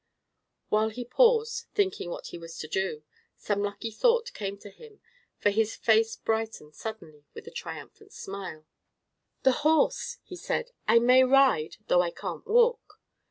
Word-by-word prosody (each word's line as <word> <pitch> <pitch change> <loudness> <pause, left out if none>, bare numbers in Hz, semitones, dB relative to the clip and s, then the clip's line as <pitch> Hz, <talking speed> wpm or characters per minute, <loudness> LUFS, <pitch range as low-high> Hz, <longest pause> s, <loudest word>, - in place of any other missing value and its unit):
While 215 +1 +2
he 245 +3 -7
paused, 460 - +2
thinking 385 - 0
what - - -7
he - - -8
was 165 0 -10
to 155 - -6
do, 170 -3 -2 0.3
some 205 -1 -1
lucky 205 +2 -4
thought 475 - +2
came 200 -1 -5
to 205 0 -12
him, 440 - -16 0.4
for 205 - +2
his 220 +1 0
face 225 0 +3
brightened 220 -9 -3
suddenly 155 -9 -9
with - - -9
a - - -10
triumphant 415 -2 -9
smile. 190 -6 -8 0.8
"The 265 - +6
horse!" 320 +10 +2
he 365 - -10
said. 480 +6 -3 0.2
"I - - +6
may 250 +2 +6
ride, 260 - +3
though 180 - +4
I 175 - 0
can't 310 - -7
walk." 470 -2 +2
225 Hz, 160 wpm, -28 LUFS, -, 0.8 s, The